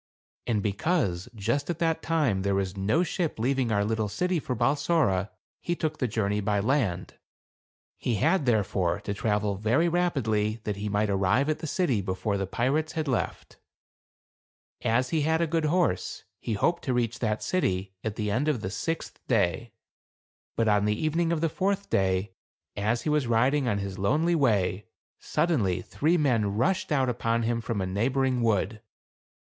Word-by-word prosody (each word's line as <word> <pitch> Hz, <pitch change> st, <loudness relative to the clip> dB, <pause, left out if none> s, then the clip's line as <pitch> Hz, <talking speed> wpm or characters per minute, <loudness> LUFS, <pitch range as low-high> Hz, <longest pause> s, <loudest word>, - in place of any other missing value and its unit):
And 105 Hz, -4 st, 0 dB
be 105 Hz, -, 0 dB
cause, 100 Hz, -, 0 dB
just 115 Hz, -, -1 dB
at 170 Hz, -, -1 dB
that 165 Hz, -1 st, 0 dB
time, 145 Hz, -12 st, +1 dB
there 100 Hz, 0 st, +1 dB
was 95 Hz, -1 st, -1 dB
no 105 Hz, -, +1 dB
ship 175 Hz, -2 st, -2 dB
leaving 125 Hz, +1 st, 0 dB
our 100 Hz, -1 st, +2 dB
little 110 Hz, -1 st, -1 dB
city 180 Hz, -, 0 dB
for 130 Hz, -3 st, -3 dB
Balsora, 125 Hz, -, +1 dB, 0.3 s
he 175 Hz, -, -2 dB
took 155 Hz, -2 st, -3 dB
the 125 Hz, -, +1 dB
journey 105 Hz, -2 st, 0 dB
by 105 Hz, 0 st, +1 dB
land. 105 Hz, -6 st, -1 dB, 0.8 s
He 120 Hz, -, 0 dB
had, 155 Hz, -, +2 dB
therefore, 100 Hz, -5 st, +1 dB
to 100 Hz, -, -3 dB
travel 105 Hz, -1 st, 0 dB
very 120 Hz, -, +2 dB
rapidly 115 Hz, -12 st, 0 dB
that 105 Hz, -2 st, -3 dB
he 105 Hz, +1 st, -3 dB
might 105 Hz, 0 st, +1 dB
arrive 100 Hz, +9 st, +2 dB
at 155 Hz, -, 0 dB
the 160 Hz, -, -5 dB
city 145 Hz, -, +1 dB
before 95 Hz, +2 st, -2 dB
the 95 Hz, -1 st, -2 dB
pirates 150 Hz, +9 st, 0 dB
had 160 Hz, -2 st, -2 dB
left. 130 Hz, -4 st, -3 dB, 1.2 s
As 125 Hz, +2 st, +1 dB
he 160 Hz, -, +1 dB
had 160 Hz, +2 st, +2 dB
a 170 Hz, -, +2 dB
good 165 Hz, 0 st, 0 dB
horse, 155 Hz, -, 0 dB, 0.2 s
he 115 Hz, -, -3 dB
hoped 170 Hz, -, +1 dB
to 130 Hz, -, 0 dB
reach 120 Hz, 0 st, -1 dB
that 110 Hz, -2 st, -1 dB
city 95 Hz, -, -1 dB
at 110 Hz, -2 st, -3 dB
the 105 Hz, -2 st, -2 dB
end 130 Hz, +8 st, 0 dB
of 140 Hz, -8 st, +1 dB
the 95 Hz, -, -4 dB
sixth 165 Hz, +9 st, -4 dB
day. 105 Hz, -1 st, +1 dB, 0.8 s
But 115 Hz, -, +1 dB
on 105 Hz, -1 st, +3 dB
the 105 Hz, 0 st, +1 dB
evening 165 Hz, +2 st, +1 dB
of 165 Hz, -2 st, 0 dB
the 165 Hz, -, +3 dB
fourth 195 Hz, +5 st, -1 dB
day, 95 Hz, 0 st, +1 dB, 0.4 s
as 110 Hz, +4 st, 0 dB
he -, -, -1 dB
was 150 Hz, -4 st, +1 dB
riding 125 Hz, +4 st, +2 dB
on 105 Hz, -4 st, +1 dB
his 100 Hz, -1 st, -5 dB
lonely 150 Hz, -, +2 dB
way, 105 Hz, -, +1 dB, 0.3 s
suddenly, 100 Hz, -, 0 dB
three 160 Hz, -, +1 dB
men 115 Hz, -10 st, +1 dB
rushed 180 Hz, -, +1 dB
out 135 Hz, -3 st, +2 dB
upon 115 Hz, -1 st, 0 dB
him 115 Hz, +1 st, 0 dB
from 115 Hz, -2 st, -3 dB
a -, -, -1 dB
neighboring 125 Hz, +6 st, 0 dB
wood. 110 Hz, -1 st, 0 dB
115 Hz, 180 wpm, -27 LUFS, 100-150 Hz, 1.2 s, on